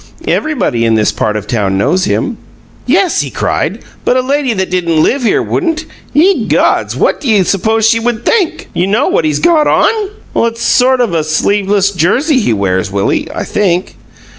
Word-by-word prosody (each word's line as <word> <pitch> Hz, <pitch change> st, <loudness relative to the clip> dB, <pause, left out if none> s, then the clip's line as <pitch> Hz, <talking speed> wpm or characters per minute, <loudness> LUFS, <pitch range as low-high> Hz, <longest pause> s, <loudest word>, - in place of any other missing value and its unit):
Everybody 265 Hz, -, 0 dB
in 115 Hz, -1 st, +2 dB
this 105 Hz, -2 st, +2 dB
part 105 Hz, -1 st, -2 dB
of 105 Hz, -, -6 dB
town 100 Hz, -4 st, -1 dB
knows 180 Hz, -, +1 dB
him." -, -, -1 dB, 0.5 s
"Yes," 355 Hz, +6 st, +2 dB
he -, -, -4 dB
cried, -, -, -2 dB, 0.2 s
"but 250 Hz, -, +2 dB
a -, -, +2 dB
lady 275 Hz, 0 st, 0 dB
that 190 Hz, -4 st, -2 dB
didn't 170 Hz, -4 st, +1 dB
live 275 Hz, -, +1 dB
here 235 Hz, -, +1 dB
wouldn't. 325 Hz, -3 st, -2 dB, 0.3 s
Ye 310 Hz, -, +2 dB
gods! -, -, +1 dB
What -, -, 0 dB
do 275 Hz, -, -3 dB
you 205 Hz, -4 st, +4 dB
suppose 220 Hz, +4 st, +1 dB
she 230 Hz, 0 st, +3 dB
WOULD 235 Hz, 0 st, -2 dB
think? 390 Hz, -8 st, 0 dB
You 180 Hz, -, 0 dB
know 220 Hz, +8 st, +1 dB
what -, -, +1 dB
he's 150 Hz, -2 st, 0 dB
got 320 Hz, -, +3 dB
on!" -, -, +3 dB, 0.6 s
"It's 230 Hz, 0 st, -5 dB
a -, -, -2 dB
sort 255 Hz, 0 st, +3 dB
of 170 Hz, -10 st, 0 dB
sleeveless 200 Hz, +4 st, +1 dB
jersey 250 Hz, -, +1 dB
he 210 Hz, -, 0 dB
wears, 95 Hz, -3 st, -1 dB
Willie, 100 Hz, 0 st, -1 dB
I -, -, -4 dB
think." 185 Hz, -3 st, -1 dB
210 Hz, 190 wpm, -12 LUFS, 160-260 Hz, 0.6 s, you